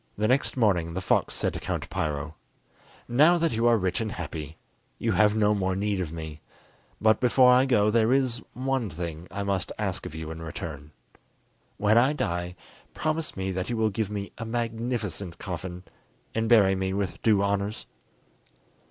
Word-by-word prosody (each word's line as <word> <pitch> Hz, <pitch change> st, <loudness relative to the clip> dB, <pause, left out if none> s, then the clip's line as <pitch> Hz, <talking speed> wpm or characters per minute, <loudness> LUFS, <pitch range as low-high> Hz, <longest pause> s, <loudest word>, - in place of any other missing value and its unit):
The 105 Hz, +1 st, +1 dB
next 130 Hz, +2 st, +1 dB
morning 90 Hz, -8 st, +2 dB
the -, -, -1 dB
fox 95 Hz, -, +1 dB
said -, -, 0 dB
to -, -, -4 dB
Count -, -, -3 dB
Piro: 75 Hz, 0 st, -2 dB, 0.7 s
"Now 150 Hz, +9 st, +5 dB
that 165 Hz, -1 st, +1 dB
you 115 Hz, +1 st, +1 dB
are 120 Hz, -1 st, +5 dB
rich 95 Hz, +2 st, -1 dB
and 110 Hz, -2 st, -2 dB
happy, 80 Hz, -2 st, -6 dB, 0.4 s
you 115 Hz, -, 0 dB
have 105 Hz, +2 st, +4 dB
no 105 Hz, -1 st, +3 dB
more 95 Hz, -2 st, 0 dB
need 100 Hz, 0 st, -1 dB
of 85 Hz, -4 st, -3 dB
me; 80 Hz, -2 st, -7 dB, 0.6 s
but, 110 Hz, 0 st, +4 dB
before 125 Hz, 0 st, +5 dB
I 130 Hz, +2 st, +4 dB
go, 105 Hz, -4 st, +3 dB
there 115 Hz, +1 st, +3 dB
is 130 Hz, -3 st, +1 dB
one 130 Hz, -3 st, -1 dB
thing 85 Hz, 0 st, -6 dB
I 100 Hz, -, -4 dB
must 100 Hz, -2 st, -1 dB
ask -, -, -2 dB
of -, -, -9 dB
you 80 Hz, 0 st, -5 dB
in 80 Hz, 0 st, -7 dB
return: 75 Hz, -2 st, -7 dB, 0.9 s
when 105 Hz, +2 st, +4 dB
I 130 Hz, +5 st, +3 dB
die, 90 Hz, -, -2 dB, 0.4 s
promise 155 Hz, -4 st, -2 dB
me 95 Hz, 0 st, -2 dB
that 95 Hz, +2 st, -3 dB
you 120 Hz, -, -1 dB
will 110 Hz, -1 st, +2 dB
give 105 Hz, 0 st, -2 dB
me 100 Hz, -1 st, -5 dB
a -, -, -3 dB
magnificent 115 Hz, -6 st, -3 dB
coffin, 90 Hz, -1 st, -6 dB, 0.5 s
and 115 Hz, 0 st, 0 dB
bury 100 Hz, -5 st, +6 dB
me 95 Hz, 0 st, -1 dB
with 100 Hz, -2 st, -3 dB
due 105 Hz, -3 st, +3 dB
honours." 100 Hz, +2 st, -1 dB
100 Hz, 180 wpm, -27 LUFS, 90-115 Hz, 0.9 s, bury